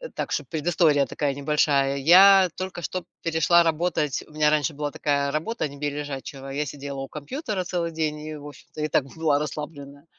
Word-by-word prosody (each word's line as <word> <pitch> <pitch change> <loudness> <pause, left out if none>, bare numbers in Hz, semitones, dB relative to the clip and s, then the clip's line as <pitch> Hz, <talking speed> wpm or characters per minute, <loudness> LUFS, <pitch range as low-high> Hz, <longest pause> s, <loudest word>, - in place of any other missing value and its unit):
так - - -4
чтоб - - -2
предыстория 155 -3 +2
такая 145 -2 -2
небольшая, 140 -1 +1
я 185 +5 +7
только 185 -1 -5
что 175 +3 -4 0.2
перешла 165 +1 +3
работать 160 -3 0
у - - -19
меня 150 0 +2
раньше 150 +1 +1
была 145 0 -3
такая 140 -1 0
работа 155 +4 -2
не 140 - -12
бей 145 +1 -2
лежачего. 140 -1 -6
Я 145 +2 -2
сидела 140 0 -6
у 135 - -5
компьютера 195 - -4
целый 170 -1 -2
день 155 -2 -2
и, 155 0 -7
в 145 0 -10
общем-то, 150 +1 -11
и 155 - 0
так 150 - +2
б 135 - -14
была 155 -3 +2
расслабленная. 145 -1 -7
150 Hz, 195 wpm, -24 LUFS, 140-165 Hz, 0.2 s, я